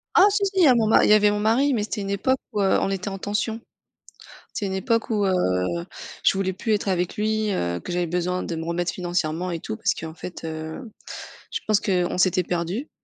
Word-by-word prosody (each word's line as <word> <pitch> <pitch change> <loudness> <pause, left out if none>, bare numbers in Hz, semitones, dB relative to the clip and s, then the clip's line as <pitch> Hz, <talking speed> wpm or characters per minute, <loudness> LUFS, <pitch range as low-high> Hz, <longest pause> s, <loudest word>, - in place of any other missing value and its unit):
Ah 390 - +8
si 405 0 +1
si, 390 - -1
il 360 - +6
y - - +7
a 250 - +6
mon 225 -2 +2
ma - - +5
il - - +2
y - - +8
avait 210 -1 +5
mon 205 - -1
mari, 250 +6 +3
mais 215 -3 0
c'était 210 0 -3
une 195 - -4
époque 260 +7 +1
où, 205 - -1
heu, 195 - +3
on - - 0
était 195 +1 -2
en 195 0 -6
tension. 215 +3 -2 0.9
C'est 205 - -3
une 190 - -3
époque 230 +4 0
où, 210 -3 +1
heu, 190 - +2 0.9
je - - +5
voulais 190 -1 0
plus 215 +3 -1
être 205 - -1
avec 180 -1 0
lui, 215 0 0
heu, 85 - -1
que 175 - -7
j'avais 175 0 0
besoin 180 +2 -1
de 170 - -4
me 165 0 -4
remettre 170 +1 -1
financièrement 175 -1 -2
et 170 - -3
tout 220 - -5
parce 225 - +1
qu'en 160 -1 -7
fait, 175 +1 -8
heu, 160 +8 -6 0.6
je - - -2
pense 215 -1 +4
qu'on 180 -4 0
s'était 185 0 +3
perdu 175 - -3
195 Hz, 245 wpm, -24 LUFS, 175-215 Hz, 0.9 s, Ah